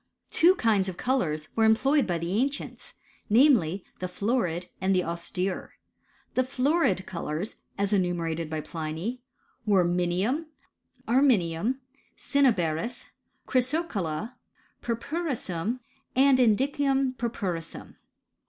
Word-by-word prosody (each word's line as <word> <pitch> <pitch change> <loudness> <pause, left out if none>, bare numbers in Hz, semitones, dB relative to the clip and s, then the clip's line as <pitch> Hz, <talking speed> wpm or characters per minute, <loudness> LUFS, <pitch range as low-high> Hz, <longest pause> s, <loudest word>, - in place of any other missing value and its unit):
Two 355 +3 +5
kinds 210 - +2
of 180 - -7
colours 170 - -1
were 225 - +3
employed 270 +6 +4
by 175 -2 0
the 175 +7 0
an 275 - +3
cients: 285 - -7 0.4
namely, 210 - +4
the 185 - -2
florid 180 -3 -1
and 190 0 +2
the 180 - +2
austere. 180 +3 -3 0.6
The 255 - +3
florid 260 - +1
Golotin, 170 +2 -4 0.2
as 200 +1 0
enumerated 170 -4 0
by 155 -1 -2
Pliny, 165 +11 -4 0.4
were 200 -5 +3
minium, 180 - 0 0.6
arme 265 +4 +5
nium, 185 +2 +1 0.4
cinnaberis, 235 - +1 0.4
ckrysocotla, 245 - -1 0.5
purpurissuin, 235 - -2 0.4
and 265 0 +5
jn 225 -5 +5
(Knun 270 -1 +1
pvrpurtMu 185 -8 -3
m - - -15
205 Hz, 115 wpm, -27 LUFS, 175-255 Hz, 0.6 s, Two